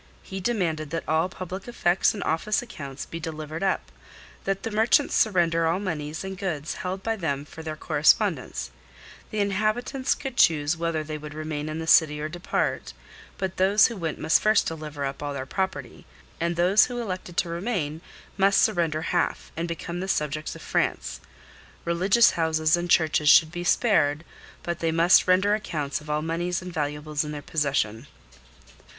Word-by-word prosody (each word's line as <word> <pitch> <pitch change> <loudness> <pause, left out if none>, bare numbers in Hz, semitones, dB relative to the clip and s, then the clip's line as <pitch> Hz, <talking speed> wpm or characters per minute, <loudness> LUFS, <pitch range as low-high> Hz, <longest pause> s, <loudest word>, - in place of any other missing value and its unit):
He 190 - -6
demanded 175 -8 -1
that 165 +2 -4
all 160 +3 +1
public 185 +2 -7
effects 190 -5 +2
and 200 - -4
office 205 +9 0
accounts 140 - -8
be 165 - -7
delivered 155 -1 -6
up; 195 -1 -1 0.5
that 195 0 -1
the 225 - -3
merchants 225 +7 +3
surrender 170 -5 +2
all 170 +3 +1
moneys 160 -5 -4
and 190 0 -5
goods 170 -6 -3
held 190 +1 -4
by 225 +1 0
them 145 -7 -2
for 160 - -11
their 155 -1 -5
correspondents; - - +1 0.6
the 215 - -5
inhabitants 215 +7 0
could 265 -3 -7
choose 150 -1 +4
whether 165 -1 -2
they 155 0 -6
would 150 0 -9
remain 155 -1 -4
in 155 - -4
the 160 - -4
city 150 -2 +5
or 150 - -2
depart; 175 +2 -2 0.4
but 190 -2 -3
those 195 +3 +5
who 235 - -6
went 165 -5 -3
must 160 - +3
first 215 0 +3
deliver 150 -3 -4
up 135 0 -5
all 145 -1 -3
their 130 -1 -4
property, 190 +7 -4 0.3
and 170 +1 0
those 185 +5 +5
who 245 -1 -5
elected 185 -5 -5
to 175 - +2
remain 170 -4 -3 0.4
must 195 0 +4
surrender 165 -6 +1
half, 175 0 -1
and 165 +1 -2
become 170 +1 -5
the 190 - -4
subjects 150 -3 -2
of - - -11
France; 60 -2 -1 0.6
religious 190 +7 +4
houses 160 -1 +2
and 175 0 -3
churches 155 -3 +3
should 160 0 +7
be 175 +1 -5
spared, 160 -7 +2 0.4
but 170 -1 -3
they 165 -1 0
must 165 +3 +5
render 190 +3 +4
accounts 155 -9 -2
of 150 - -13
all 150 0 0
moneys 175 +2 -1
and 180 -1 -8
valuables 150 0 -2
in 150 - -5
their 145 -1 -6
possession. 140 -6 -1
170 Hz, 175 wpm, -25 LUFS, 155-190 Hz, 0.6 s, should